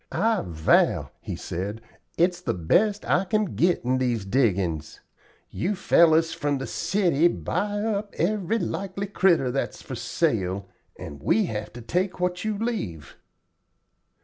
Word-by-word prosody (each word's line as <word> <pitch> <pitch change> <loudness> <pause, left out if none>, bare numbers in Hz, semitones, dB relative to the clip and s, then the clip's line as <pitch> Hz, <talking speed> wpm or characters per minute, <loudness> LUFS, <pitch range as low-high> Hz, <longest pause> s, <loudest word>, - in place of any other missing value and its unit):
'I 225 -1 +1
vow,' 80 -2 +2
he - - -5
said, 100 +5 -4 0.4
'it's 175 +1 +2
the - - -1
best 200 - +2
I 180 - +3
kin 215 0 0
get 170 - +2
in 130 +1 +1
these 120 -5 0
diggin's. 95 - 0 0.5
You 185 - -1
fellers 165 -3 +4
from 145 -1 -1
the 135 - -4
city 170 -3 +2
buy 205 +3 -2
up 210 -2 -2
every 200 +4 0
likely 195 -2 -3
critter 180 -9 +2
that's 135 - -3
for - - -8
sale, 95 +1 -1 0.3
and 70 -1 -9
we 110 +8 +2
have 105 -1 -4
to 120 - -9
take 180 - -1
what 180 0 -1
you 215 -1 -1
leave.' 180 - -4
170 Hz, 145 wpm, -25 LUFS, -, 0.5 s, fellers